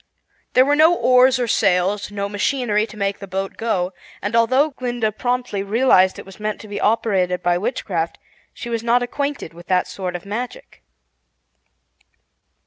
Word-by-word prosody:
There 255 - +6
were 290 +1 +3
no 320 +3 +5
oars 255 -3 +4
or 245 -1 -1
sails, 200 -1 +1
no 200 -1 -3
machinery 210 +1 0
to 215 - -13
make 200 -1 -1
the 200 - -8
boat 195 +1 -4
go, 190 -5 -1 0.3
and 205 +4 -3
although 260 +6 +3
Glinda 240 -4 -2
promptly 245 -2 -2
realized 200 -3 +3
it - - -9
was 195 +1 -14
meant 210 0 -3
to 215 - -11
be 205 -1 -5
operated 190 -5 +1
by 175 0 +2
witchcraft, 180 -6 -2 0.3
she - - -9
was 230 -1 -1
not 240 +1 +2
acquainted 280 - -4
with 175 +1 -14
that 185 -1 +2
sort 180 -2 -5
of 175 - -7
magic. 230 +5 -6
210 Hz, 165 wpm, -20 LUFS, 195-245 Hz, 0.3 s, There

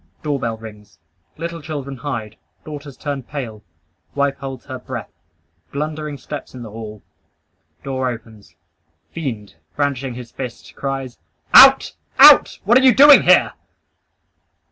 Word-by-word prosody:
Doorbell 135 -7 -2
rings. 105 -2 -13 0.4
Little 170 0 -6
children 140 -3 -6
hide. 115 -5 -6 0.3
Daughters 145 -2 -9
turn 140 -2 -4
pale. 120 -5 -7 0.5
Wife 140 -1 0
holds 135 -2 -8
her 130 -2 -7
breath. 125 -2 -8 0.6
Blundering 150 0 -5
steps 140 +1 -9
in 125 - -8
the 110 - -10
hall. 110 -2 -9 0.8
Door 130 -1 -2
opens. 110 -6 -11 0.6
Fiend, 115 - -6 0.2
brandishing 140 -3 -2
his 125 -1 -10
fist, 125 -3 -9
cries 135 -2 -5 0.3
"Out! - - +8 0.2
Out! - - +7
What 235 +6 +5
are - - -1
you 260 -4 +5
doing 290 +1 +8
here!" - - +4
135 Hz, 125 wpm, -19 LUFS, 115-145 Hz, 0.8 s, Out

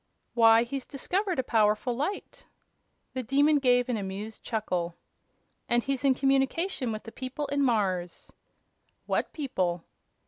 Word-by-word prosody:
"Why, 230 -1 +6
he's 260 +2 -5
discovered 365 +6 -1
a 260 - +1
powerful 220 +1 +2
light," 305 +11 -4 0.7
the 260 - -2
Demon 285 +5 +3
gave 245 -2 +3
an 245 -3 -1
amused 205 +2 -6
chuckle, 180 -7 -2 0.7
"and 240 0 +3
he's 275 -1 -2
in 270 -2 +4
communication 270 +1 +1
with 215 0 -5
the 225 - -9
people 260 +5 -5
in 285 0 +1
Mars." 190 -9 0 0.7
"What - - -1
people?" 185 - -2
245 Hz, 135 wpm, -28 LUFS, 215-275 Hz, 0.7 s, Why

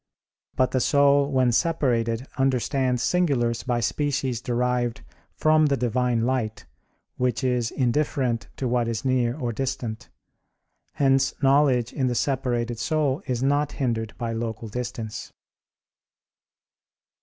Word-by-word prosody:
But 130 - +2
the 130 - +1
soul 140 +1 +3
when 130 -2 +3
separated 120 -5 +1
understands 130 -1 +1
singulars 125 -10 +1
by 120 -2 -1
species 135 -3 -1
derived 125 -1 -1 0.3
from 155 0 +4
the 140 -1 +1
Divine 125 -1 0
light, 115 -3 -1 0.5
which 125 +1 0
is 125 -3 +1
indifferent 125 -2 0
to 130 - -2
what 120 -1 +1
is 115 +2 -3
near 125 -1 +1
or 120 -5 -2
distant. 120 -3 -4 0.8
Hence 135 -1 +2
knowledge 135 -3 +3
in 130 -2 0
the 125 - -1
separated 120 -3 -1
soul 150 +2 0
is 125 -1 -1
not 145 +2 +1
hindered 115 -5 -2
by 115 -2 -3
local 115 -1 -4
distance. 115 -1 -5
125 Hz, 120 wpm, -25 LUFS, 120-135 Hz, 0.8 s, from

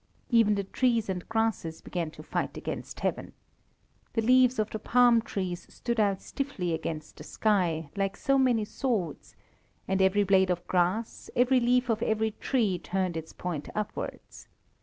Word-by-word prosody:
Even 225 -3 +5
the 200 - -1
trees 230 +1 +1
and 180 -2 -4
grasses 225 -8 -1
began 170 -3 -3
to - - -12
fight - - -3
against - - -6
Heaven. - - -2 0.8
The 225 - 0
leaves 255 +1 +5
of 215 -1 0
the 215 - -4
palm 240 0 +4
trees 185 -5 -4
stood 235 -1 -3
out 200 -3 +1
stiffly 205 -12 -3
against 160 -1 -5
the - - -9
sky, 170 -6 0
like 195 0 -1
so 275 0 +2
many 245 -5 +3
swords, 215 - -3 0.5
and 190 0 +1
every 190 +2 +4
blade 190 -1 +4
of 175 -1 -1
grass, 185 +5 0
every 250 +1 +4
leaf 250 +1 +2
of 225 -2 0
every 220 -1 +1
tree 210 -6 0
turned 185 0 -2
its 160 0 -5
point 170 -5 -5
upwards. 210 -1 -5
205 Hz, 160 wpm, -28 LUFS, 180-235 Hz, 0.8 s, Even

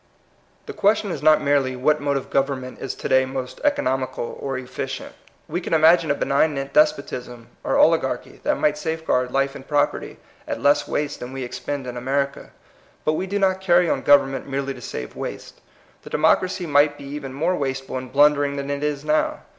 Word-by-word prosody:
The 430 - -7
question 205 - +2
is 145 - -4
not 155 0 +5
merely 140 -2 +2
what 150 +4 +1
mode 140 -1 0
of 135 - -7
government 135 -2 -1
is 135 - -4
to - - -5
day 130 0 +4
most 130 -1 -6
economical 130 - -1
or 135 -1 -3
efficient. 130 +1 -6 0.3
We 170 +4 -3
could 170 - -4
imagine 160 +1 +5
a 145 - +2
benig 145 +3 +2
nant 135 0 -5
despotism 125 -5 0
or - - +1
oligarchy - - +2
that - - 0
might 150 0 +1
safeguard 160 -6 -1
life 135 +1 +1
and 135 - -11
property 145 -1 0 0.3
at - - -3
leas 145 0 +3
waste 145 0 -2
than 125 +1 -7
we 135 -1 -4
expend 135 +2 -5
in 125 -1 -6
America. 140 +2 -2 0.6
But 155 - +2
we 185 +4 -2
do 200 +2 -1
not 190 -1 +1
carry 175 -2 +4
on - - 0
government 135 -2 +3
merely 135 0 -2
to - - -12
save 60 - -6
waste. - - -7 0.4
The - - -11
democracy 175 +4 +2
might 145 -1 +3
be - - -11
even 140 -1 -6
more 165 +7 0
wasteful 135 -3 -3
and 130 -1 -10
blundering 145 0 +4
than 140 0 -4
it 140 +1 -3
is 150 -1 -2
now. 155 0 +1
140 Hz, 195 wpm, -22 LUFS, 135-155 Hz, 0.6 s, not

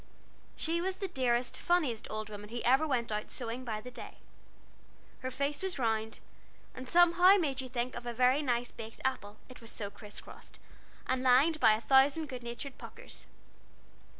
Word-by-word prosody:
She 335 +1 -1
was 375 +1 -1
the 390 0 -4
dearest, 250 -6 0
funniest 310 -11 +1
old 215 0 -4
woman 210 -1 -9
who 240 +1 -4
ever 265 +6 +4
went 235 -5 -1
out 210 0 -3
sewing 240 +1 -5
by 220 -3 -4
the 250 - -9
day. - - -10 1.0
Her 255 - -4
face 280 +3 -2
was 380 -3 -2
round, 225 -3 -1 0.5
and 255 0 -8
somehow 350 +2 +6
made 280 -7 -1
you 260 - -8
think 245 0 -2
of 240 0 -7
a - - -1
very 250 +4 +3
nice 245 -3 -1
baked 225 0 -10
apple, 215 -6 -2
it 255 - -13
was 230 - -8
so 205 -3 -6
criss 205 0 -11
crossed, - - -13 0.5
and 260 0 0
lined 265 +5 +4
by 220 -3 +6
a 215 - -1
thousand 280 +4 +4
good 255 -2 -6
natured 240 +3 -7
puckers. - - -10
255 Hz, 180 wpm, -32 LUFS, 230-285 Hz, 1.0 s, somehow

